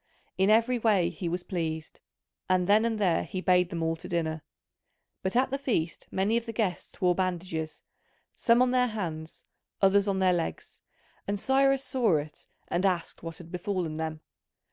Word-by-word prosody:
In 190 +1 +2
every 230 +3 +4
way 205 -7 +3
he 175 0 -4
was 175 +1 -2
pleased, 160 -4 -4 0.5
and 185 -1 +3
then 210 +4 +4
and 225 -1 0
there 185 -6 +2
he 185 - -5
bade 180 -1 +3
them 170 -3 -3
all 165 0 0
to - - -9
dinner. 160 -2 -1 0.8
But 190 +3 -2
at 255 +1 +3
the 275 - -1
feast 210 - -2
many 200 +4 +1
of 235 0 -3
the 230 - -4
guests 205 -5 -2
wore 180 -1 +4
bandages, 175 -3 -3 0.5
some 235 +1 +4
on 250 - +1
their 250 -1 +3
hands, 165 -8 -5 0.3
others 195 +1 +4
on 195 -1 +1
their 185 -1 +3
legs, 170 -2 -4 0.5
and 200 0 -1
Cyrus 270 +2 +3
saw 230 - +2
it 150 +1 -7 0.2
and 175 - -1
asked 180 -4 0
what 165 -1 -7
had 170 -1 -12
befallen 180 -3 -2
them. 160 -1 -4
185 Hz, 180 wpm, -28 LUFS, 165-220 Hz, 0.8 s, every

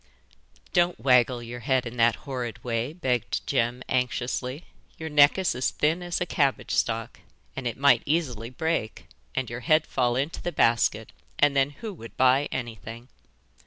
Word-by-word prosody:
'Don't 175 -1 +2
waggle 125 -2 +3
your 120 +1 -7
head 130 +1 +1
in 120 0 -6
that 115 -2 +3
horrid 125 -5 -5
way,' 120 +2 -2
begged 130 - -2
Jem 120 +2 0
anxiously. 125 +3 -2 0.3
'Your 160 0 -5
neck 145 +1 +6
is 190 -2 +1
as 125 +2 0
thin 160 +4 0
as 175 -1 -2
a 180 - 0
cabbage 140 -6 0
stalk, 115 -1 -1 0.4
and 135 -2 -3
it 120 - -4
might 140 -4 +5
easily 130 -8 -1
break 130 -4 -2 0.3
and 130 -2 -1
your 120 +1 -5
head 155 +5 +3
fall 125 -2 0
into 140 +5 -2
the 175 - -3
basket, 115 -6 +2 0.3
and 145 -1 +3
then 135 0 +3
who 205 +9 -8
would 115 -10 -12
buy 130 +2 +4
anything? 115 0 -6
130 Hz, 165 wpm, -26 LUFS, 120-145 Hz, 0.4 s, neck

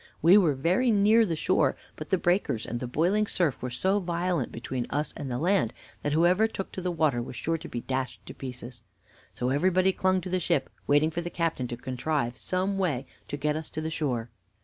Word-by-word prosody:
We 170 +4 +7
were 170 -9 +5
very 180 - +2
near 215 +1 +5
the 165 - -1
shore, - - +2 0.2
but - - -8
the 190 - +3
breakers 175 - +1
and 120 - -4
the 125 - -4
boiling 180 +11 +1
surf 170 -10 0
were 125 - -3
so 190 +12 +1
violent 175 - -1
between 120 +1 -4
us 150 +1 -2
and 140 - -5
the 120 - -2
land 175 - +2 0.3
that 145 - -1
whoever 180 +7 +4
took 195 -3 -6
to 185 - -5
the 180 - -1
water 155 -7 +1
was 120 - -7
sure 165 +4 -1
to - - -9
be 120 - -4
dashed 130 0 -4
in - - -7
pieces. 125 -2 -8 0.5
So 125 - -1
everybody 185 +7 +3
clung 185 0 +2
to 180 - -6
the 185 - +1
ship, 140 -5 0 0.2
waiting 145 +2 +4
for 170 - -2
the 175 - -4
captain 165 -7 -1
to 120 - -5
contrive 125 0 -2
some 185 +7 -1
way 145 -9 0 0.2
to 145 - -4
get 150 +1 0
us 155 0 -5
to - - -5
the 160 +1 -3
shore." 125 -8 -2
160 Hz, 220 wpm, -28 LUFS, 130-185 Hz, 0.5 s, We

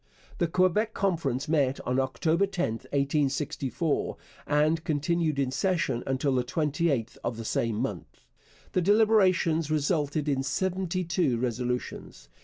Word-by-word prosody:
The 170 - +2
Quebec 185 +6 +1
Conference 155 -9 0
met 145 -4 +1
on 125 +1 0
October 160 +8 +1
10, 180 - -1 0.2
1864, 140 +1 -1 0.3
and 155 +2 +2
continued 160 -1 0
in 135 -2 0
session 140 -5 0
until 135 +1 0
the 125 -1 +1
28th 145 -3 -1
of 120 -1 -2
the 115 - -6
same 115 0 0
month. - - -5 0.5
The 185 - +1
deliberations 185 -6 +3
resulted 150 -1 0
in 135 -2 +1
seventy 185 +4 -1
two 165 -7 +1
resolutions. 125 +1 -4
150 Hz, 125 wpm, -28 LUFS, 135-175 Hz, 0.5 s, deliberations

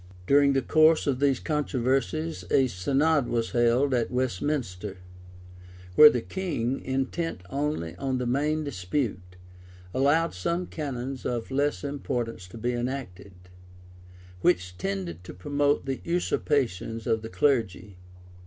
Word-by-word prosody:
During 140 +2 +5
the 135 -1 +1
course 155 +3 +4
of 135 -3 0
these 140 -3 +2
controversies, 150 +2 -1
a 135 - +4
synod 135 - +1
was 115 -1 -1
held 120 +3 +3
at 120 -2 +1
Westminster, 115 -5 -2 1.0
where 150 +9 +10
the 120 -4 -2
king, 145 -10 -2
intent 135 - -2
only 140 - -2
on 130 +5 -1
the 125 - -2
mam 150 +5 0
dispute, 95 -6 -3 0.6
allowed 145 +5 +2
some 170 - -2
canons 135 -5 -5
of 120 +1 -3
less 145 +2 0
importance 120 -8 -3
to 95 - -11
be 120 +2 -1
enacted, 120 -6 -5 1.1
which 90 0 +1
tended 90 -3 -4
to 90 - -10
promote 145 +9 0
the 135 -1 -3
usurpations 125 - -1
of 110 -1 +1
the 110 - -7
clergy. 110 -8 0
130 Hz, 125 wpm, -27 LUFS, 110-145 Hz, 1.1 s, where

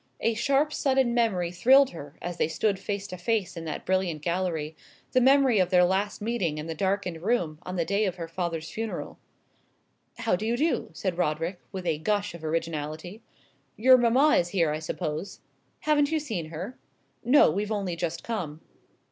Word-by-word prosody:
A 230 - +2
sharp 280 +6 +1
sudden 265 -3 +2
memory 195 -8 +1
thrilled 260 +9 +5
her, 145 -3 -10
as 175 0 -4
they - - +2
stood 195 +5 0
face 200 -1 -3
to 185 -3 -7
face 205 +1 -1
in 165 -1 -6
that 155 - -5
brilliant 185 -5 0
gallery 170 -3 -2 0.4
the 255 - +3
memory 265 -3 +5
of 185 -1 +2
their 180 -1 +5
last 195 +3 -1
meeting 195 -9 -1
in 150 - -5
the 165 - -4
darkened 190 -1 -1
room 175 -7 0
on 180 +1 -6
the 170 -2 0
day 200 +5 +1
of 185 -3 -2
her 170 -2 -6
father's 165 -1 -4
funeral. 225 0 -5 1.0
"How 230 -5 +1
do 180 - -5
you 230 +2 0
do?" 315 +5 0
said 185 -3 -3
Roderick, 165 +3 -1
with 190 -2 -6
a 160 -3 0
gush 205 +3 0
of 170 -2 -10
originality. 160 +4 -3 0.6
"Your 255 +4 +7
mamma 255 +6 +4
is 175 - +1
here, 170 -5 +1
I 155 - -2
suppose." 160 +3 -4 0.4
"Haven't 295 -1 +2
you 320 - +2
seen 220 - -4
her?" 175 +10 -7 0.4
"No; 255 +5 +6
we've 210 +2 -2
only 195 -5 -1
just 170 -1 -3
come." 170 -10 -4
185 Hz, 185 wpm, -27 LUFS, 165-230 Hz, 1.0 s, Your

